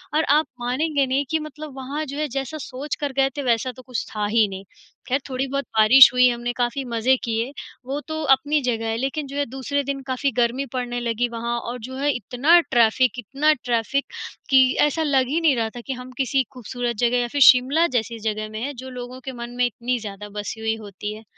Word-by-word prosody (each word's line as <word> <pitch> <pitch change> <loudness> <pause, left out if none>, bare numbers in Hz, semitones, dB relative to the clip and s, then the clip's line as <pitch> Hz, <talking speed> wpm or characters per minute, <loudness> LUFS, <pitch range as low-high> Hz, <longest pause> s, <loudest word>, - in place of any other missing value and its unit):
और 315 - +3
आप 300 +2 +4
मानेंगे 275 +4 0
नहीं 270 +2 0
कि 320 - +1
मतलब 305 -1 -8
वहाँ 275 +4 -4
जो 280 +1 -7
है, 305 - -1
जैसा 275 +3 -4
सोच 275 0 -5
कर 290 -2 -2
गए 270 0 +4
थे, - - -1
वैसा 240 +1 +1
तो 255 +1 -13
कुछ 250 -2 -4
था 210 -1 0
ही 215 +1 +3
नहीं। 190 -1 -8 0.4
ख़ैर 265 +2 +1
थोड़ी 260 +1 -1
बहुत 275 +1 -2
बारिश 230 +5 +9
हुई, 250 0 +6
हमने 240 0 -2
काफ़ी 245 +2 -1
मज़े 240 +2 +2
किए, 230 +2 -1 0.3
वो 275 +3 -3
तो 315 0 -3
अपनी 295 +2 -1
जगह 225 -3 -1
है। 225 - -1
लेकिन 275 +4 -2
जो 280 +1 -7
है, 285 - +1
दूसरे 270 +3 -2
दिन 275 0 -3
काफ़ी 265 +1 0
गर्मी 245 +3 +1
पड़ने 245 -1 -2
लगी 235 0 -1
वहाँ 235 +1 -3
और 245 +1 -6
जो 260 - -8
है, 285 +2 0
इतना 255 - +4
ट्रैफिक, 245 +1 +3
इतना 275 +7 +2
ट्रैफिक 240 +3 0 0.4
कि 265 -1 +7 0.2
ऐसा 295 +2 +2
लग 270 -4 +2
ही 300 +6 0
नहीं 300 -5 +4
रहा 225 -1 -1
था 240 - -6
कि 265 - -1
हम 250 0 -9
किसी 265 0 +1
खूबसूरत 245 0 -4
जगह 245 +1 +2
या 245 - 0
फिर 285 +3 -3
शिमला 270 +7 +2
जैसी 230 0 -3
जगह 215 0 -3
में 215 +1 -6
है, 285 +3 -3
जो 260 +1 -9
लोगों 250 0 -8
के 265 - -4
मन 240 -1 -7
में 250 - +3
इतनी 245 +1 -2
ज़्यादा 210 -1 -8
बसी 205 +2 -5
हुई 220 0 -1
होती 210 -1 -7
है। 220 +1 -12
255 Hz, 225 wpm, -23 LUFS, 235-275 Hz, 0.4 s, बारिश